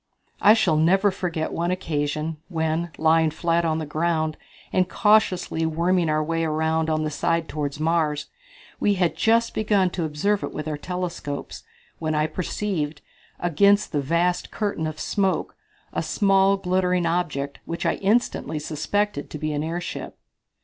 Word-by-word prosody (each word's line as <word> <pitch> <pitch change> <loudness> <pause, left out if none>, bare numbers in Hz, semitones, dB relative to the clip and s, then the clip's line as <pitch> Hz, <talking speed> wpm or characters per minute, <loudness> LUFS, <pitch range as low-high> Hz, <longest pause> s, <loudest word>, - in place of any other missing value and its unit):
I 210 +2 +7
shall 170 -8 +2
never 190 +6 +4
forget 175 -4 -3
one 170 +1 -1
occasion, 155 -3 -2
when, 160 0 -1
lying 160 0 +4
flat 170 +2 0
on 160 -1 +1
the 160 - -3
ground, 155 0 0 0.4
and 185 -1 +2
cautiously 195 -6 +2
worming 170 +2 +1
our 155 0 +1
way 165 +1 -1
around 160 0 0
on 155 0 +1
the 155 - -2
side 165 +2 0
toward 145 -1 -4
Mars, 155 -2 +1 0.5
we 205 - +2
had 175 -4 +1
just 230 +7 +2
begun 205 -4 +2
to 175 - -2
observe 180 +7 0
it - - -5
with 150 0 -4
our 155 - -2
telescopes, 175 -3 -5 0.4
when 155 -1 -1
I 150 0 +2
perceived, 160 -3 -3 0.4
against 200 +5 +3
the 145 - 0
vast 170 +5 0
curtain 200 -7 -2
of 155 0 -6
smoke, 195 +1 0 0.4
a - - 0
small, 195 -1 +3
glinting 180 -1 +1
object, 155 -5 -1
which 170 - -4
I - - +1
instantly 205 -5 0
suspected 160 +3 -2
to - - -6
be 155 0 -2
an 145 0 -1
airship. 170 +2 -5
165 Hz, 155 wpm, -24 LUFS, 155-185 Hz, 0.5 s, I